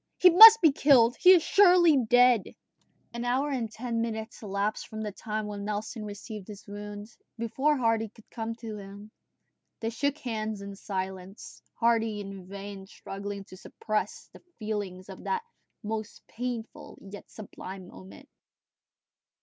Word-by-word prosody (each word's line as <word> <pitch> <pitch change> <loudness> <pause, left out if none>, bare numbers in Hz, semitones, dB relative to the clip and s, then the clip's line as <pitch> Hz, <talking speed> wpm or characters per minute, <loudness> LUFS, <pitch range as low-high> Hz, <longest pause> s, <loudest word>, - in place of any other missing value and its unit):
He 365 - +7
must 445 +5 +11
be 320 - +7
killed! 255 -4 +4
He 365 - +7
is 345 -4 +4
surely 355 -4 +5
dead!" 245 -3 +5 0.7
An 235 0 -4
hour 260 +4 0
and 235 -5 -3
ten 230 0 -3
minutes 220 -1 -5
elapsed 205 0 -3
from 220 -1 -7
the 210 - -4
time 215 +1 -5
when 205 -1 -6
Nelson 210 +2 -4
received 205 -1 -8
his 205 -2 -11
wound, 205 0 -8 0.3
before 270 +6 0
Hardy 225 -3 0
could 220 +1 -20
come 225 0 -5
to 225 -2 -8
him. 200 +1 -11 0.7
They 225 0 -3
shook 285 +5 -1
hands 220 -5 -4
in 200 0 -8
silence, 190 0 -7
Hardy 225 -2 +1
in 195 -2 -9
vain 195 0 -9
struggling 200 0 -7
to 185 - -14
suppress 215 +3 -4
the - - -15 0.2
feelings 205 -4 -5
of 190 -2 -11
that 465 -1 -1 0.4
most 215 0 -5
painful 240 -1 -6
and 195 0 -14
yet 205 - -10
sublime 190 -3 -10
moment. 95 +1 -14
215 Hz, 150 wpm, -28 LUFS, 200-240 Hz, 0.7 s, must